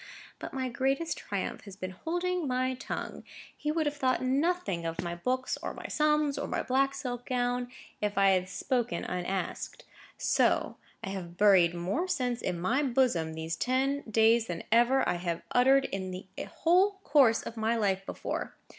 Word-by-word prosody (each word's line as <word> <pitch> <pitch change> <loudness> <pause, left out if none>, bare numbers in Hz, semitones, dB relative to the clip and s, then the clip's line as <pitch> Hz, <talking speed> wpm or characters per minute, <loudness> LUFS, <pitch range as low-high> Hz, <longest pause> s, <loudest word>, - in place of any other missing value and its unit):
But - - -6
my 260 -1 -2
greatest 270 +6 0
triumph - - -4
has 200 -2 -10
been 185 -2 -5
holding 350 - -2
my 255 0 0
tongue. 255 - -5 0.3
He 300 - -2
would 320 0 0
have 295 0 -1
thought 255 -2 +1
nothing 280 - 0
of 165 0 -4
my 170 0 -3
books, 255 +9 -2
or - - -4
my - - -9
sums, 300 -2 +2
or 285 - -3
my - - -2
black 270 +1 +1
silk 245 -2 -5
gown, 245 0 0 0.3
if 205 -1 -1
I 195 0 +5
had 185 0 +1
spoken 245 +3 -1
unasked. 180 +1 -3 0.3
So - - +2 0.3
I - - -3
have 175 -3 -6
buried 185 -4 +5
more 190 - -1
sense 250 -9 -1
in 175 - -2
my 230 +11 +1
bosom 235 - +1
these 160 +1 -3
ten 265 +6 0
days 225 +1 +4
than 170 -1 -4
ever 240 +4 +4
I 175 - +1
have 170 -1 -3
uttered 270 +2 +5
in 190 -1 -4
the 185 +1 -7 0.2
whole 370 +5 +3
course 270 -6 +4
of 230 - -7
my 225 +1 +1
life 195 -4 +1
before. - - -4
245 Hz, 175 wpm, -30 LUFS, 190-275 Hz, 0.3 s, I